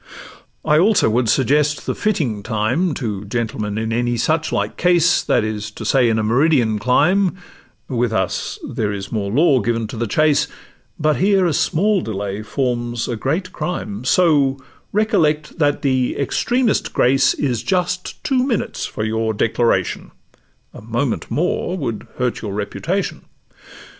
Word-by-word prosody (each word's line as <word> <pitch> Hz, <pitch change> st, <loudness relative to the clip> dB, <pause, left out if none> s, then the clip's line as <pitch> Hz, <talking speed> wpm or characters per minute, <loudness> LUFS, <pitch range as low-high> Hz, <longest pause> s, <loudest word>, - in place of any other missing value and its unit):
I 150 Hz, +1 st, +4 dB
also 195 Hz, -, +4 dB
would 120 Hz, 0 st, +1 dB
suggest 150 Hz, +3 st, +2 dB
the -, -, -1 dB
fitting 150 Hz, -, -1 dB
time 120 Hz, -, 0 dB
To 105 Hz, -6 st, -4 dB
gentlemen 110 Hz, -1 st, -3 dB
in 110 Hz, +1 st, -2 dB
any 120 Hz, 0 st, 0 dB
such 160 Hz, +6 st, 0 dB
like -, -, -1 dB
case, 175 Hz, -1 st, +3 dB
That -, -, +1 dB
is 110 Hz, -1 st, -3 dB
to 105 Hz, -, -9 dB
say 130 Hz, -3 st, +3 dB
in 110 Hz, -, +1 dB
a 110 Hz, -, 0 dB
meridian 120 Hz, -2 st, +2 dB
clime— 185 Hz, -, +2 dB, 0.5 s
With 120 Hz, -3 st, 0 dB
us 95 Hz, -5 st, -2 dB
there 105 Hz, -2 st, -2 dB
is 100 Hz, -1 st, -6 dB
more 105 Hz, -3 st, -2 dB
law 140 Hz, +2 st, +4 dB
given 115 Hz, -1 st, -1 dB
to 120 Hz, -, -7 dB
the 120 Hz, +1 st, -1 dB
chase, 150 Hz, +5 st, +2 dB, 0.5 s
But 155 Hz, -1 st, +1 dB
here 195 Hz, 0 st, +3 dB
a 170 Hz, -, +1 dB
small 195 Hz, +7 st, +1 dB
delay 100 Hz, -3 st, -4 dB
forms 120 Hz, 0 st, -2 dB
a 120 Hz, -, -2 dB
great 165 Hz, -, -2 dB
crime: 120 Hz, -, -4 dB
So 140 Hz, -3 st, +3 dB, 0.3 s
recollect 170 Hz, -8 st, +1 dB
that 145 Hz, -2 st, +1 dB
the 130 Hz, -2 st, +1 dB
extremest 240 Hz, -, 0 dB
grace 135 Hz, +2 st, +3 dB
Is 125 Hz, -6 st, -1 dB
just 180 Hz, -1 st, -2 dB
two 260 Hz, -2 st, +1 dB
minutes 250 Hz, -6 st, -2 dB
for 110 Hz, -, -5 dB
your 110 Hz, 0 st, -1 dB
declaration— 110 Hz, -4 st, 0 dB, 0.6 s
A -, -, -11 dB
moment 115 Hz, +4 st, -2 dB
more 180 Hz, +2 st, -1 dB
would 120 Hz, -, -4 dB
hurt 125 Hz, -1 st, -1 dB
your 100 Hz, -3 st, -5 dB
reputation. 160 Hz, -, -3 dB
130 Hz, 155 wpm, -19 LUFS, 110-165 Hz, 0.6 s, I